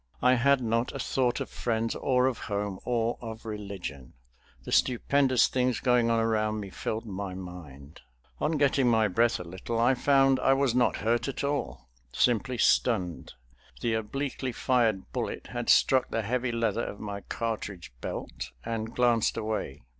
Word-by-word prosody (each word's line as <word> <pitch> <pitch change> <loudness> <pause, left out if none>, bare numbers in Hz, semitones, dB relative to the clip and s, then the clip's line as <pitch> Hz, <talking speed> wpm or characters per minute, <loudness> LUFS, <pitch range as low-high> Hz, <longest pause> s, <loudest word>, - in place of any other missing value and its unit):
I 125 0 +6
had 135 +2 +3
not 115 +1 0
a - - -4
thought 125 -1 0
of - - -3
friends, 115 -1 -1
or 125 -1 +1
of 130 -3 0
home, 100 -2 -3
or 120 -1 0
of 115 -1 -8
religion. 100 - -6 0.5
The - - -7
stupendous 130 0 +3
things 125 -1 0
going 125 -2 +3
on 115 0 +2
around 110 -1 0
me 100 -2 -7
filled 110 +4 -4
my 100 -2 -5
mind. 80 -6 -10 0.4
On 155 - 0
getting 140 -3 +2
my 110 -2 +4
breath 115 +5 +2
a - - -5
little 95 +7 -4
I 120 +3 +4
found 135 0 +3
I 135 - +4
was 135 -3 +2
not 125 0 +2
hurt 120 +3 +1
at 135 - -4
all, 140 - -3 0.2
simply 125 - +1
stunned; 95 -7 +1 0.5
the 115 - 0
obliquely 130 +4 -3
fired 115 -5 +1
bullet - - -4
had - - -3
struck 130 -1 +4
the 115 - -1
heavy 125 +3 -1
leather 115 -1 0
of 100 - -6
my 100 -1 -5
cartridge 100 - -5
belt - - -5 0.2
and 115 0 -4
glanced 120 -3 +2
away. 105 - -3
115 Hz, 165 wpm, -28 LUFS, 105-125 Hz, 0.5 s, I